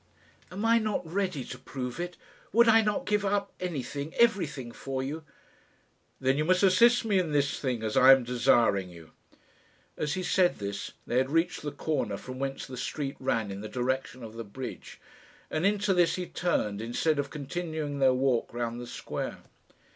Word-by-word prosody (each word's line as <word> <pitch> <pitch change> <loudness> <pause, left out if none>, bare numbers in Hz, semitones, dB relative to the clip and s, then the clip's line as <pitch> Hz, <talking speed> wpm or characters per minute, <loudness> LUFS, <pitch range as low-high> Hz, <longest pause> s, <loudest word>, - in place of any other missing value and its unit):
"Am 200 +4 -3
I 230 0 +5
not 215 -5 -1
ready 180 -4 -2
to - - -8
prove 125 +1 -6
it? 175 0 -4 0.4
Would 235 +1 +6
I 225 0 +7
not 210 -1 -1
give 210 -1 +1
up 200 0 0
anything, 145 -3 -4
everything, 170 - +1
for 135 +1 -4
you?" 155 +4 -4 1.0
"Then 135 +2 +1
you - - +2
must 185 +3 +3
assist 235 +6 +5
me 205 -4 +3
in 165 -5 -1
this 140 -1 +1
thing, 125 -5 -2
as 110 -1 -2
I 130 +1 +8
am 135 -1 +6
desiring 115 -5 +3
you." 85 -2 -13 0.8
As 150 +3 -2
he 185 - -3
said 180 0 +3
this 100 0 -5
they 120 - -1
had 130 +1 0
reached 165 +3 +1
the 145 - -4
corner 140 -9 -2
from 130 +4 -8
whence 135 0 -3
the 130 -1 -8
street 140 +3 -3
ran 115 -5 -1
in 100 +1 -6
the 110 - -6
direction 130 0 -2
of 110 -1 -8
the 115 0 -6
bridge, 125 +5 -8 0.5
and 155 +5 +2
into 205 -1 +2
this 175 -2 +3
he 180 - -3
turned 105 - -1
instead 140 +7 0
of 140 0 -1
continuing 150 0 -4
their 135 -1 +5
walk 130 -2 +1
round 120 0 -3
the 120 - -7
square. - - -5
140 Hz, 185 wpm, -29 LUFS, 125-180 Hz, 1.0 s, I